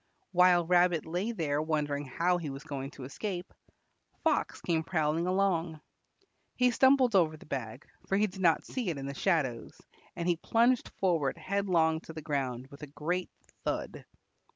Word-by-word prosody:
While 180 -1 +5
Rabbit 175 -2 +3
lay 180 +8 -2
there 150 -8 -1
wondering 150 -2 -1
how 175 +7 +1
he 160 -4 -4
was 135 +1 -7
going 135 -1 -5
to 135 - -8
escape, 180 +7 -5 0.7
Fox - - +1
came 165 -2 0
prowling 160 0 0
along. 180 -4 +1 0.8
He 250 -1 +3
stumbled 260 -2 +4
over 160 -4 +3
the - - -15
bag, 130 -3 -5 0.2
for 195 - +1
he 210 - +4
did 190 -1 -7
not 165 -3 +3
see 245 -7 -3
it 160 - -2
in 135 - -5
the 140 - -4
shadows, 140 -8 -1 0.4
and 170 - -3
he 175 -2 +2
plunged 235 +7 +2
forward 170 -6 0
headlong 170 -3 +1
to 165 - -10
the 155 - -7
ground 130 -4 -2
with 140 - -13
a 150 - -6
great 170 +6 -3 0.3
thud. - - -3
165 Hz, 170 wpm, -30 LUFS, 145-185 Hz, 0.8 s, While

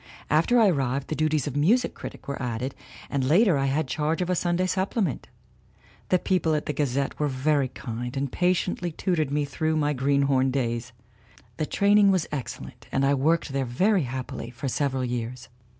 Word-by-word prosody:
After 170 +11 +4
I 220 - +6
arrived 135 -4 -1
the 155 - -1
duties 155 -3 +1
of 145 - -4
music 200 +13 +3
critic - - -9
were 140 0 -4
added, 125 +1 -3 0.3
and 140 -2 -1
later 175 - +4
I 135 0 +1
had 140 +2 0
charge 155 +4 -1
of 180 - -2
a - - +2
Sunday 175 +1 +1
supplement. 190 - -1 0.8
The 185 - +4
people 180 -4 +1
on 150 - -1
the 150 - -2
Gazette 140 -1 -1
were 150 - +1
very 140 +1 +1
kind 125 0 -6
and 135 -1 -2
patiently 180 0 0
tutored 160 -3 -1
me 145 +1 0
through 155 +3 -1
my 150 -1 +1
green 140 +1 +2
horn 135 -1 +2
days. 125 -2 -2 0.7
The 155 - -1
training 200 0 +4
was 185 -4 +2
excellent 140 -4 -6
and 135 - +1
I 140 - +3
worked 155 +5 +1
there 135 -1 0
very 185 - +2
happily 125 -1 -5
for 125 +3 -6
several 135 -1 0
years. 120 +1 -4
145 Hz, 185 wpm, -26 LUFS, 130-170 Hz, 0.8 s, I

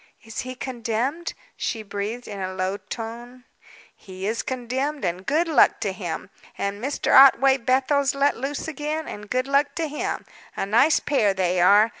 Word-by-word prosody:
"Is 225 -1 -7
he 255 0 -5
condemned?" 250 +6 -3 0.2
she 220 - -3
breathed, 210 +4 -5
in 200 -2 -7
a 185 0 -4
low 185 +1 -1
tone. 240 +3 -8 0.5
"He 190 -1 -9
is 220 +3 -1
condemned, 260 +3 -3
and 180 +2 -3
good 320 +5 +2
luck 320 - +4
to - - 0
him! - - -5 0.3
And 200 +2 -3
Mr. 275 +2 -1
Otway 270 0 +7
Bethel's 270 +3 +1
let 280 +1 +2
loose 275 +5 -4
again, 310 +1 -3
and 205 0 -8
good 255 0 0
luck 280 +1 +2
to 330 -1 -1
him. 300 0 -4 0.3
A - - -1
nice 235 +10 +4
pair 220 -9 +1
they 180 -1 +1
are! 205 +5 +6
250 Hz, 170 wpm, -24 LUFS, 205-280 Hz, 0.5 s, Otway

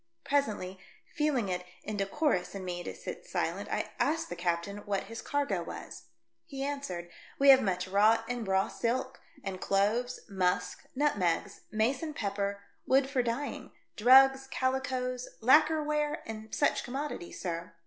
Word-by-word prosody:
Presently, 210 -10 0 0.3
feeling 290 -8 +1
it 180 -1 -2 0.2
inde 200 -2 -2
corus 235 - 0
in 190 -1 -5
me 175 -1 -3
to - - -6
sit - - -8
silent, - - -2
I - - -2
asked 325 +2 +1
the 175 - -4
captain 175 +3 -1
what 200 -1 0
his 230 +3 -7
cargo 280 -11 -1
was. 170 - -8 0.4
He 270 0 -6
answered, 190 -12 -4 0.3
"We 280 0 +5
have 265 -1 +9
much 185 -2 -1
wrought 215 +4 +4
and 245 -3 -3
raw 190 0 +2
silk, 255 +3 -2 0.2
and 190 -2 -5
cloves, 220 +6 +1
musk, 185 -3 -1
nutmegs, 200 - 0
mace 225 +5 +1
and 310 -2 -4
pepper, 200 -2 -2 0.2
wood 270 +1 +3
for 265 -3 +2
dyeing, 245 +4 -3 0.2
drugs, 265 +3 +6
cali 260 0 0
coes, 255 -1 -3
lacker 305 +6 +5
ware 300 +1 -1
and 220 0 -7
such 290 - +2
commodities, 270 -8 -5
sir." 170 -2 -4
230 Hz, 155 wpm, -31 LUFS, 195-270 Hz, 0.4 s, have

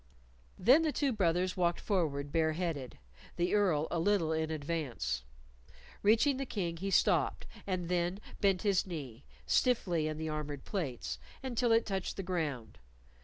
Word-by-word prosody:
Then 255 - +6
the 315 -1 +1
two 280 -2 +1
brothers 180 -2 +1
walked 175 -2 +1
forward 145 -8 -1
bare 160 -1 +2
headed, 155 -7 -3 0.4
the 175 +1 0
Earl, 180 -7 +3
a 170 - 0
little 170 -3 +2
in 160 0 -1
advance. 150 - -2 0.8
Reaching 230 +7 +4
the 275 - -2
King 175 -7 -2
he 195 +4 -3
stopped, - - +2 0.2
and 185 -3 -1
then 175 +2 0 0.2
bent 195 -3 +2
his 200 -3 +2
knee 140 -8 -7 0.2
stiffly 180 -11 +2
in 155 -1 -3
the 160 0 -3
armored 150 -3 -4
plates 125 - -3 0.2
until 245 -2 0
it 225 0 +4
touched 195 -2 -3
the 195 - -3
ground. 150 - -3
175 Hz, 155 wpm, -33 LUFS, 155-200 Hz, 0.8 s, Then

